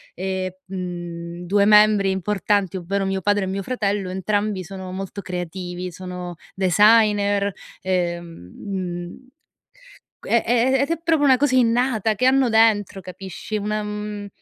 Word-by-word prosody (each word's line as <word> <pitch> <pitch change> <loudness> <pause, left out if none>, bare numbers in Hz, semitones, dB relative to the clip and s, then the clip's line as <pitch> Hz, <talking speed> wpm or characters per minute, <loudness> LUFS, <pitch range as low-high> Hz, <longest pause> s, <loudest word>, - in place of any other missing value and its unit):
ehm, 190 -1 -2 0.2
mhmm, 175 -2 -6
2 200 +2 +3
membri 210 -2 +5
importanti, 195 0 0
ovvero 195 +3 -2
mio 190 0 -1
padre 205 +1 +1
e - - -2
mio 195 +1 -2
fratello, 200 -4 -2
entrambi 205 +1 -1
sono 190 +1 -8
molto 195 +1 -6
creativi, 180 0 -5
sono 180 0 -7 0.2
designer, 205 +1 +3 0.3
uhm, 170 - -3
mhmm 180 +3 -5 0.9
q - - -11
e 235 - +3
e 245 +3 +3
ed 280 - -3
è 335 - +1
proprio 320 -3 +2
una 265 -2 +6
cosa 275 -1 +2
innata, 230 -3 +2
che 255 +5 -1
hanno 265 -1 +4
dentro, 215 -3 +3
capisci, 190 +3 -6
una 210 +1 -2
mhmm, 210 0 -5
195 Hz, 140 wpm, -22 LUFS, 185-215 Hz, 0.9 s, una